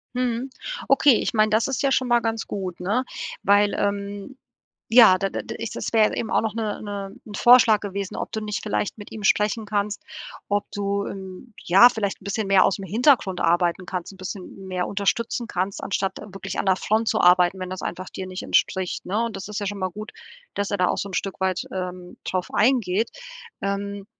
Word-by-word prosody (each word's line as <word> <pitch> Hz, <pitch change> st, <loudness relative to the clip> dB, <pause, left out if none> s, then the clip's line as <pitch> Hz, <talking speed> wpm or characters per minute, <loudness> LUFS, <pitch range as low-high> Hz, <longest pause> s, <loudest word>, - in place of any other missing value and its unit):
Mhm. 250 Hz, +1 st, -1 dB, 0.4 s
Okay, 275 Hz, -1 st, +5 dB
ich -, -, -1 dB
meine, 215 Hz, -1 st, +3 dB
das 220 Hz, +1 st, +3 dB
ist 270 Hz, -, -2 dB
ja 275 Hz, -, +2 dB
schon 260 Hz, -1 st, +2 dB
mal 240 Hz, -1 st, +4 dB
ganz 225 Hz, -1 st, -2 dB
gut, 185 Hz, -3 st, -5 dB
ne, 205 Hz, +8 st, 0 dB, 0.4 s
weil, 205 Hz, +1 st, +4 dB
ähm, 200 Hz, +4 st, -3 dB, 0.5 s
ja, 225 Hz, -6 st, +8 dB
da 195 Hz, -, 0 dB
da -, -, -4 dB
da -, -, -6 dB
ist 230 Hz, -1 st, -5 dB
das -, -, -3 dB
wäre 220 Hz, -2 st, +5 dB
ja -, -, -5 dB
eben 220 Hz, -, -3 dB
auch -, -, +3 dB
noch 220 Hz, -1 st, -3 dB
'ne 215 Hz, -2 st, -3 dB
'ne 200 Hz, -2 st, -6 dB
'n 210 Hz, -, -10 dB
Vorschlag 240 Hz, -2 st, +6 dB
gewesen, 200 Hz, -1 st, -5 dB
ob -, -, -4 dB
du 220 Hz, -, -3 dB
nicht 210 Hz, -1 st, -4 dB
vielleicht 210 Hz, 0 st, -2 dB
mit 205 Hz, -, -11 dB
ihm 215 Hz, -2 st, -7 dB
sprechen 210 Hz, +3 st, +2 dB
kannst, 205 Hz, 0 st, -2 dB, 0.5 s
ob 205 Hz, 0 st, +1 dB
du 200 Hz, 0 st, -1 dB
im 190 Hz, +4 st, -8 dB
ja, 195 Hz, +8 st, +7 dB
vielleicht 210 Hz, -5 st, -3 dB
'n -, -, -16 dB
bisschen 200 Hz, 0 st, -2 dB
mehr 195 Hz, -1 st, +5 dB
ausm 195 Hz, +1 st, 0 dB
Hintergrund 220 Hz, -, +2 dB
arbeiten 175 Hz, +2 st, +1 dB
kannst, 180 Hz, 0 st, -5 dB
'n -, -, -16 dB
bisschen 190 Hz, 0 st, -8 dB
mehr 180 Hz, -1 st, -2 dB
unterstützen 225 Hz, +4 st, -1 dB
kannst, 190 Hz, 0 st, -3 dB
anstatt 195 Hz, -1 st, -2 dB, 0.2 s
wirklich 195 Hz, -, -6 dB
an -, -, -1 dB
der 190 Hz, -1 st, +4 dB
Front 220 Hz, +4 st, 0 dB
zu 220 Hz, -, +2 dB
arbeiten, 180 Hz, +1 st, +5 dB
wenn 185 Hz, 0 st, -5 dB
das 185 Hz, 0 st, -6 dB
einfach 185 Hz, +1 st, -5 dB
dir 190 Hz, -, -6 dB
nicht 185 Hz, 0 st, -6 dB
entspricht, 190 Hz, -2 st, 0 dB
ne? 210 Hz, +5 st, 0 dB
Und 230 Hz, -3 st, -3 dB
das 195 Hz, +1 st, -6 dB
ist 210 Hz, 0 st, -4 dB
ja 205 Hz, -, -3 dB
schon 205 Hz, +1 st, -4 dB
mal 185 Hz, -1 st, -2 dB
gut, 215 Hz, +4 st, -8 dB, 0.4 s
dass 200 Hz, 0 st, -2 dB
er 200 Hz, -, 0 dB
da 180 Hz, -1 st, +2 dB
auch -, -, 0 dB
so 200 Hz, -, -3 dB
'n -, -, -11 dB
Stück 195 Hz, +1 st, -3 dB
weit, 190 Hz, -1 st, 0 dB
ähm, 180 Hz, -1 st, -6 dB
drauf 185 Hz, -1 st, -2 dB
eingeht. 220 Hz, -3 st, +2 dB, 0.5 s
Ähm 200 Hz, 0 st, -3 dB
200 Hz, 220 wpm, -24 LUFS, 190-220 Hz, 0.5 s, ja